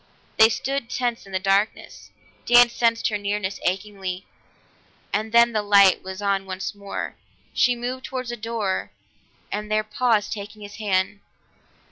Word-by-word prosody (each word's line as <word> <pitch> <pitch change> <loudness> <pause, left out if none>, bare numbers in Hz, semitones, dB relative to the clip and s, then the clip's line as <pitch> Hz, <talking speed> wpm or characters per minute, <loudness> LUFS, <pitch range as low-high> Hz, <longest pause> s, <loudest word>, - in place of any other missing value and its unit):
They 220 0 +9
stood 250 +3 -2
tense 240 -4 -2
in - - -13
the 190 - 0
darkness; 195 +3 -1 0.4
Dan 240 0 +7
sensed 230 -1 +1
her 210 -1 -2
nearness 200 -1 -2
achingly, 190 -1 -3 0.9
and 215 +1 -1
then 235 +1 +6
the 215 -2 0
light 200 -2 +5
was 190 +2 -7
on 195 -1 0
once 185 0 -4
more. 200 -1 -6 0.4
She 250 -2 +3
moved 250 +2 -5
toward 255 -1 -4
the 240 - -3
door, 220 -4 -2 0.6
and 210 +1 -4
there 215 0 +2
paused, 215 -1 +1
taking 210 0 -8
his 205 0 -10
hand. 200 -1 0
210 Hz, 150 wpm, -23 LUFS, 195-235 Hz, 0.9 s, They